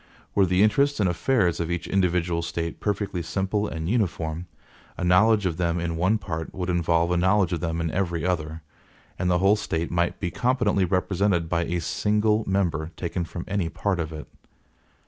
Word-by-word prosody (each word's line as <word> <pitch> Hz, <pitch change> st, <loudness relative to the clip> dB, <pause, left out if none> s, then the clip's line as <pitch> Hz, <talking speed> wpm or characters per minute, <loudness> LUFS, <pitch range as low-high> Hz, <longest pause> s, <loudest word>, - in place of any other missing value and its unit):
Were 100 Hz, -2 st, +3 dB
the 90 Hz, +3 st, +3 dB
interests 140 Hz, +6 st, +2 dB
and 100 Hz, -, +3 dB
affairs 90 Hz, 0 st, +1 dB
of 85 Hz, -1 st, -2 dB
each 85 Hz, 0 st, -2 dB
individual 90 Hz, -3 st, +1 dB
State 85 Hz, 0 st, -4 dB
perfectly 100 Hz, -3 st, -2 dB
simple 95 Hz, +5 st, -1 dB
and 80 Hz, -3 st, -4 dB
uniform, 90 Hz, -6 st, -1 dB, 0.5 s
a -, -, -3 dB
knowledge 100 Hz, +4 st, +4 dB
of 85 Hz, -3 st, -1 dB
them 85 Hz, -1 st, 0 dB
in 85 Hz, -1 st, -2 dB
one 95 Hz, +6 st, +2 dB
part 80 Hz, -5 st, -5 dB
would 90 Hz, -1 st, -2 dB
involve 85 Hz, 0 st, +1 dB
a 90 Hz, -, +2 dB
knowledge 95 Hz, 0 st, +2 dB
of 85 Hz, -, -1 dB
them 80 Hz, 0 st, -2 dB
in 80 Hz, -1 st, -1 dB
every 85 Hz, -2 st, -1 dB
other, 80 Hz, -3 st, -2 dB, 0.6 s
and 90 Hz, -, 0 dB
the 90 Hz, -, +3 dB
whole 95 Hz, +3 st, +4 dB
State 85 Hz, -5 st, -3 dB
might 85 Hz, 0 st, 0 dB
be 90 Hz, -4 st, -2 dB
competently 120 Hz, -6 st, +1 dB
represented 90 Hz, -1 st, +1 dB
by 85 Hz, 0 st, 0 dB
a 85 Hz, +1 st, -1 dB
single 105 Hz, +5 st, +1 dB
member 85 Hz, -5 st, 0 dB
taken 85 Hz, 0 st, -3 dB
from 85 Hz, +1 st, -7 dB
any 95 Hz, -4 st, -1 dB
part 85 Hz, +3 st, -1 dB
of 80 Hz, -1 st, -3 dB
it. 75 Hz, -1 st, -8 dB
90 Hz, 185 wpm, -25 LUFS, 85-100 Hz, 0.6 s, knowledge